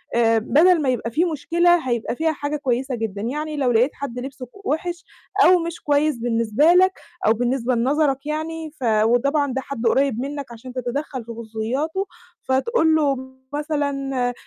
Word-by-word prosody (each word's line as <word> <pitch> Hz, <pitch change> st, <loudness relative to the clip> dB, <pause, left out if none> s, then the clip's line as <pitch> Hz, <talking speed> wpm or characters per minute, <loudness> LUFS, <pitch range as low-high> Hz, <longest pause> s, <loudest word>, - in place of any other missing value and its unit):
آآ 230 Hz, -1 st, +4 dB
بدل 325 Hz, +9 st, +4 dB
ما 275 Hz, -, +1 dB
يبقى 235 Hz, -2 st, -1 dB
فيه 335 Hz, +7 st, +1 dB
مشكلة 340 Hz, 0 st, +2 dB
هيبقى 235 Hz, -1 st, -1 dB
فيها 320 Hz, +4 st, +1 dB
حاجة 290 Hz, 0 st, -3 dB
كويسة 265 Hz, -2 st, -1 dB
جدًا، 220 Hz, -3 st, -4 dB
يعني 300 Hz, +6 st, -3 dB
لو 260 Hz, -3 st, +2 dB
لقيت 240 Hz, +4 st, +3 dB
حد 250 Hz, -3 st, -6 dB
لبسه 255 Hz, 0 st, -7 dB
ك 395 Hz, +11 st, -18 dB
وحِش 345 Hz, +2 st, -2 dB, 0.4 s
أو 365 Hz, 0 st, +6 dB
مش 335 Hz, 0 st, -5 dB
كويس 290 Hz, -1 st, +2 dB
بالنسبة 230 Hz, +6 st, +2 dB
لك 375 Hz, +1 st, +5 dB, 0.3 s
أو 220 Hz, -, +5 dB
بالنسبة 245 Hz, +1 st, 0 dB
لنظرك 275 Hz, +3 st, +1 dB
يعني، 315 Hz, +1 st, -4 dB
ف 260 Hz, -, -7 dB
وطبعًا 245 Hz, +6 st, +2 dB
ده 265 Hz, -, -1 dB
حد 265 Hz, -4 st, -6 dB
قريب 265 Hz, -1 st, +2 dB
منك 280 Hz, -1 st, -5 dB
عشان 240 Hz, +2 st, -10 dB
تتدخل 255 Hz, +1 st, -4 dB
في 235 Hz, -, -8 dB
خصوصياته، 235 Hz, -, -3 dB, 0.4 s
فتقول 320 Hz, -, +2 dB
له 290 Hz, -3 st, +2 dB, 0.4 s
مثلًا: 275 Hz, -4 st, -1 dB
275 Hz, 165 wpm, -22 LUFS, 240-310 Hz, 0.4 s, أو